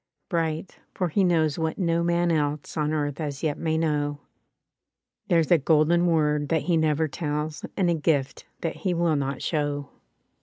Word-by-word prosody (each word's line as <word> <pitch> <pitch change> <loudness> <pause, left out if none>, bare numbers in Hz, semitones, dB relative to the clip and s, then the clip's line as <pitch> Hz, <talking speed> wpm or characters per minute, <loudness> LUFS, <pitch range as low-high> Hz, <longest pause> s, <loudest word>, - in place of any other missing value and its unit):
Bright, 165 0 -2 0.2
for 180 -2 0
he 195 +5 +2
knows 160 -4 +2
what 160 0 -1
no 170 -3 +1
man 170 0 +1
else 150 -2 -1
On 150 -1 0
earth 145 0 -2
as 145 -1 -4
yet 150 -2 -1
may 160 -1 0
know: 145 -2 0 1.1
There's 165 -2 +2
a 170 - +6
golden 160 +4 +3
word 150 -3 +1
that 160 -2 +1
he 175 - +1
never 160 0 +2
tells. 150 0 -3
And 190 - +2
a 170 - +3
gift 150 -4 -1
that 165 - -3
he 185 -3 -1
will 170 -2 +2
not 140 -1 -2
show. 145 -3 -1
155 Hz, 175 wpm, -25 LUFS, 150-170 Hz, 1.1 s, a